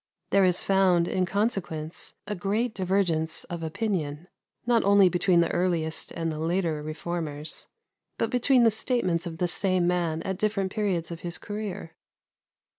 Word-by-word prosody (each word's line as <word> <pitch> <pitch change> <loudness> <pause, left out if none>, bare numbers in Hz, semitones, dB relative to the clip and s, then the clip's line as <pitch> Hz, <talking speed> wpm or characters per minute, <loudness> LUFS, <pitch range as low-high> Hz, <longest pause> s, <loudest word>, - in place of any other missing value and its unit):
There 195 -1 +5
is 180 -1 +3
found, 185 -3 +3
in 185 -1 0
consequence, 180 -6 -2
a 210 - -3
great 210 +5 -1
divergence 180 -5 0
of 170 -1 -6
opinion, 165 -2 -3 0.4
not 235 -1 +3
only 200 -1 +6
between 175 0 +3
the 170 - +1
earliest 170 -3 0
and 165 -1 -2
the 155 - -5
later 165 -1 0
Reformers, 155 -1 -4 0.5
but 230 - -1
between 250 0 +4
the 225 - +5
statements 190 -7 0
of 165 -1 -6
the 180 - +1
same 185 0 +2
man 170 -2 0
at 190 -1 -3
different 200 -3 0
periods 185 -6 -1
of 170 - -6
his 170 0 -3
career. 205 -5 -6
180 Hz, 155 wpm, -27 LUFS, 165-200 Hz, 0.5 s, only